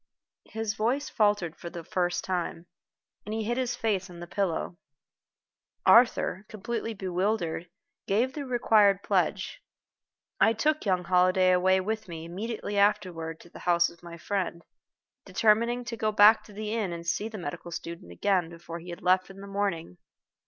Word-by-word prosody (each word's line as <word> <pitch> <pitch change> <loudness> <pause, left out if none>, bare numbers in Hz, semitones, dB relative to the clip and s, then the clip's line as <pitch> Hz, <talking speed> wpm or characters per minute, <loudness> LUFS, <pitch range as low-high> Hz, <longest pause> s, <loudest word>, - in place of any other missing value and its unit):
His 220 -1 -2
voice 240 +7 0
faltered 205 -7 +1
for 170 - -8
the 170 0 -8
first 175 +1 -1
time, 175 -2 -3 0.6
and 215 +2 -4
he 220 - -1
hid 240 +4 -1
his 245 -2 -1
face 210 -5 -1
on 175 -1 -11
the 175 - -6
pillow. 175 -2 -2 1.1
Arthur, 230 -5 +5
completely 225 +1 -4
bewildered, 185 -2 -1 0.4
gave 235 +7 +1
the 295 - -4
required 215 -6 +3
pledge. - - 0 0.8
I 225 - +5
took 300 +2 0
young 185 -2 +2
Holliday 185 +1 +4
away 185 +1 +4
with 220 +2 -3
me 165 -2 -7
immediately 205 +3 -3
afterward 180 -6 +1
to 175 - -17
the - - -11
house 170 0 +4
of 170 - -19
my 170 -1 -9
friend, 180 -1 -3 0.6
determining 235 +2 +2
to 235 -1 -4
go 215 -1 0
back 210 +1 +7
to - - -14
the 210 +1 -4
inn 210 -6 -1
and 170 0 -6
to - - -14
see 205 +5 0
the 220 - -7
medical 170 -1 -6
student 170 - -7
again 180 - +1
before 170 0 -8
he 175 +2 -11
had 170 - -8
left 185 +1 +3
in 195 0 -12
the 200 - -8
morning. 195 - -3
195 Hz, 170 wpm, -28 LUFS, 175-220 Hz, 1.1 s, back